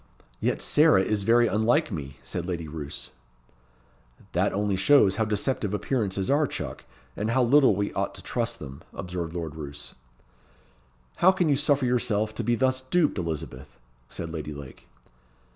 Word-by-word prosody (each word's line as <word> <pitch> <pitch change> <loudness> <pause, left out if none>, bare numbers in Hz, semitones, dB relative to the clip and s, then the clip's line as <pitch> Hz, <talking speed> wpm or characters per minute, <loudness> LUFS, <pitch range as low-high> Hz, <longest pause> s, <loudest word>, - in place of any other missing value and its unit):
"Yet - - -1
Sarah 80 +9 +5
is 105 0 0
very 120 +4 +4
unlike 115 +8 +2
me," 70 -2 -6
said 90 -1 -4
Lady 85 -3 -3
Roos. 75 -5 -7 1.2
"That - - +1
only 100 0 0
shows 100 0 +4
how 110 - +2
deceptive 105 -1 -1
appearances 100 -6 -1
are, 145 +2 +3
chuck, 65 - -6 0.3
and 105 +2 -2
how 125 +2 +3
little 130 -3 +5
we 100 +1 -2
ought - - -2
to - - -11
trust 115 -1 -2
to - - -10
them," 70 -1 -9
observed 90 -2 -5
Lord 80 -4 -4
Roos. 75 -2 -8 1.2
"How 185 +2 +6
can 180 -4 +1
you 145 - +4
suffer 145 -1 +2
yourself 110 -4 0
to - - -4
be 120 +2 +2
thus 130 +1 +1
duped, 150 - +1
Elizabeth?" 80 -6 -5 0.3
said 85 -1 -6
Lady 75 -2 -5
Lake. 70 -2 -11
105 Hz, 160 wpm, -26 LUFS, 85-125 Hz, 1.2 s, How